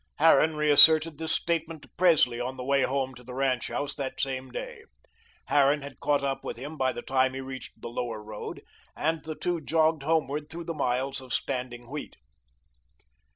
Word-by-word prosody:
Harran 160 0 +5
reasserted 155 +1 +6
this 160 -1 -2
statement 165 -2 -1
to - - -16
Presley 155 -9 +4
on 130 +2 -4
the 125 - -5
way 140 +1 +2
home 130 0 -1
to 125 - -14
the 125 +1 -9
ranch 130 -3 0
house 145 0 -3
that 135 -2 -5
same 130 -1 -2
day. 125 - -7 0.7
Harran 145 0 +3
had 140 -1 -10
caught 145 -1 +1
up 135 -1 -2
with - - -5
him 145 +6 -7
by 130 -3 +1
the - - -7
time 130 0 +1
he - - -4
reached 130 0 -8
the - - -7
Lower 120 -2 -4
Road, 105 0 -8 0.3
and 160 +1 -1
the 155 0 -5
two 175 0 -2
jogged 160 0 +2
homeward 150 -1 -1
through 170 +1 -7
the 165 - -3
miles 135 -1 -1
of 130 -1 -12
standing 120 0 -3
wheat. 145 +3 -7
140 Hz, 190 wpm, -27 LUFS, 130-155 Hz, 0.7 s, reasserted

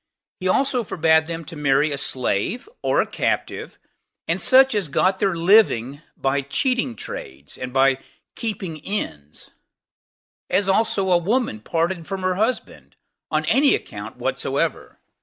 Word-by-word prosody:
He 185 - -2
also 255 +4 +2
forbade 160 -4 +2
them 165 -1 -5
to 165 - -9
marry 145 0 +2
a 140 - -2
slave, 130 - -1
or - - +2
a - - -1
captive, - - -3 0.5
and - - 0
such 265 0 +6
as 205 -5 0
got 185 +6 +1
their 195 -3 +1
living 165 - +3 0.2
by 135 +1 0
cheating 240 - -1
trades, 70 -7 -8
and 125 0 -6
by 135 0 +3 0.3
keeping 195 -8 -4
inns; 75 - -5 1.0
as 195 0 +1
also 195 -1 +2
a 175 - +5
woman 205 - 0
parted 165 - -2
from 195 -1 -4
her 185 0 +1
husband, 220 +7 -3 0.3
on - - 0
any 280 +1 +4
account - - -8
whatsoever. - - -2
175 Hz, 140 wpm, -22 LUFS, 140-210 Hz, 1.0 s, such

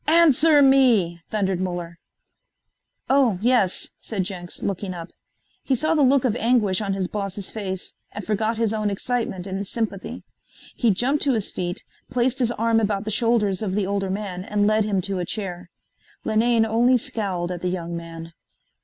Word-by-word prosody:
"Answer 310 -2 +6
me," 235 -11 +4
thundered 190 -4 0
Muller. 175 -2 -4 1.1
"Oh 260 -8 +3
yes," 230 -4 +2
said 200 -4 -3
Jenks, 180 -2 -6
looking 195 -1 -3
up. 170 0 -7 0.5
He 265 - +1
saw 310 +6 +1
the 310 - +2
look 265 -1 +4
of 230 -3 +1
anguish 225 -5 +2
on 200 -2 -1
his 190 -2 -1
boss's 200 -1 -4
face 190 -4 -5 0.2
and 205 -2 -7
forgot 220 +1 0
his 225 -1 +1
own 215 -1 0
excitement 200 -3 -2
in 195 0 -3
sympathy. 205 -1 -4 0.5
He 235 - +2
jumped 255 +9 +1
to 275 - +3
his 215 -4 -2
feet, 175 -1 -4 0.3
placed 250 +2 0
his 240 -2 +2
arm 230 0 +2
about 205 -1 -1
the 215 - -2
shoulders 215 -3 +1
of 195 -3 -2
the 205 -2 +1
older 195 0 -1
man 190 -2 -4
and 205 +1 0
led 215 0 +3
him 200 -3 0
to 195 -1 -2
a - - -1
chair. 180 -3 -5 0.5
Linane 225 +1 +3
only 240 +3 +3
scowled 190 -7 -3
at 175 -1 -5
the 180 - -1
young 170 -2 -4
man. 165 0 -8
205 Hz, 175 wpm, -23 LUFS, 185-235 Hz, 1.1 s, Answer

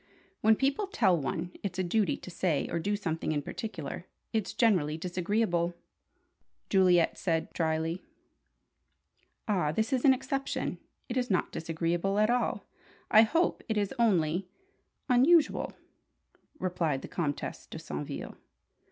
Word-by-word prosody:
"When 220 0 +5
people 275 - 0
tell 215 - +3
one 165 +3 -3
it's 190 -3 -4
a 185 - +1
duty 200 +3 +1
to 185 - -10
say 170 -3 0
or 170 - 0
do 205 +5 0
something 165 -6 -2
in 145 -2 -1
particular, 170 -5 -6 0.3
it's 220 -3 0
generally 175 -10 +2
disagreeable," 175 0 0 1.0
Juliet 180 -3 +4
said, 165 -2 -1
drily. 160 +1 -1 1.5
"Ah, 180 -8 +1
this 220 - 0
is 255 - +1
an 275 - +7
exception! 270 +1 -2 0.3
It 250 - -3
is 250 -1 0
not 185 -4 +1
disagreeable 170 +4 -1
at 215 +2 +4
all 245 0 0 0.5
I 215 - +9
hope. 325 +10 +2
It 220 - 0
is 205 -2 0
only 180 -5 +2 0.6
unusual," 285 +6 +4 0.9
replied 165 -7 -1
the - - -6
Comtesse 150 -5 -3
de - - -8
Saintville. 75 -1 -6
185 Hz, 135 wpm, -30 LUFS, 165-220 Hz, 1.5 s, I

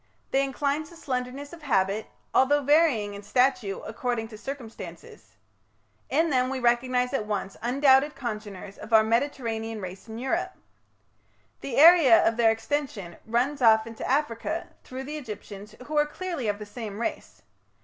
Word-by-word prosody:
They 270 +1 +3
incline 280 +2 -1
to 340 - -15
slenderness 265 0 -4
of 335 - -11
habit, 210 -6 0 0.3
although 285 +2 +4
varying 275 -8 +3
in 200 - -8
stature 250 -2 +1
according 225 0 -3
to 220 - -10
circumstances. 255 -3 -9 0.7
In 325 0 +2
them 255 -1 +2
we 265 0 -3
recognize 250 +1 +1
at 215 -6 -1
once 200 -2 -3
undoubted 270 +3 +3
congeners 210 -6 -6
of 220 - -8
our 220 0 +7
Mediterranean 225 -2 -1
race 185 +1 -8
in 220 0 -7
Europe. 255 +2 -2 1.1
The 265 - -5
area 315 -7 +8
of 225 - +2
their 230 -1 +4
extension 225 - -3
runs 255 +5 0
off 220 -2 +5
into 230 -1 -6
Africa, 295 +4 -1
through 260 +1 -7
the 300 +3 -6
Egyptians, 210 -5 -9
who 305 - -5
are 295 - +3
clearly 335 -6 -4
of 205 -1 0
the 210 - -8
same 210 -1 -7
race. 235 - -5
245 Hz, 155 wpm, -26 LUFS, 220-280 Hz, 1.1 s, area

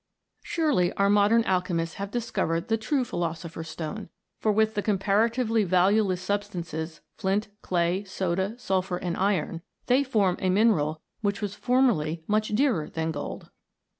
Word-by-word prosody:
Surely 295 - +1
our 200 0 +2
modern 210 +3 +4
alchemists 180 -3 0
have 200 0 -4
discovered 200 -7 -1
the 225 - +3
true 250 +4 0
philosopher's 165 -3 -4
stone, 165 +6 -6 0.3
for 215 - +2
with 220 +1 +2
the 205 - -1
compara 205 +2 +2
tively 225 -2 +1
valueless 185 +1 +2
substances, 175 -5 -3 0.2
flint, 200 +3 0
clay, 175 +2 0
soda, 190 +1 -2
sulphur, 190 -6 -1
and 175 -1 -3
iron, 185 -4 0 0.2
they 255 +3 +3
form 210 -9 +1
a 185 - 0
mineral 180 -7 +2 0.2
which 200 -2 0
was 205 -2 -3
formerly 210 -11 +1
nmch 215 0 +1
dearer 230 - +1
than 160 0 -2
gold 145 -2 -6
195 Hz, 145 wpm, -27 LUFS, 170-220 Hz, 0.3 s, modern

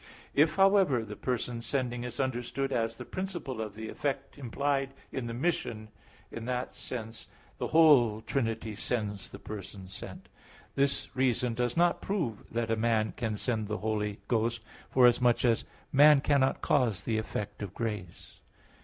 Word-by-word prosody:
If, 155 +2 +4
however, 195 - +4
the 105 0 -7
person 120 -1 -2
sending 120 -1 -2
is 125 -1 -6
understood 130 +1 -1
as 115 -1 0
the - - -8
principle 175 - -4
of 110 -2 -5
the 110 0 -6
effect 135 +2 -3
implied 135 +1 -1 0.2
in 130 -3 -3
the 115 - -4
mission, 120 -7 -1 0.4
in 115 - -6
that 125 0 -2
sense 115 -2 -7 0.3
the - - -1
whole 135 -10 +5
Trinity 115 -3 -2
sends 105 -3 -3
the - - -9
person 100 -2 -8
sent. 95 - -9 0.5
This 140 0 0
reason 125 -2 +1
does 120 +2 -1
not 175 0 +3
prove 160 - -3
that 115 -1 -1
a - - +3
man 110 -1 +1
can 110 -3 -2
send 110 -2 -1
the 105 +1 -2
Holy 105 -2 -1
Ghost, 115 0 0 0.3
forasmuch 125 -1 +4
as 115 -2 +2 0.3
man 145 +1 +7
cannot 135 -1 +2
cause 125 -9 +2
the 110 -2 0
effect 105 -1 -5
of 100 -2 -6
grace. 105 -7 -5
120 Hz, 155 wpm, -30 LUFS, 110-135 Hz, 0.5 s, man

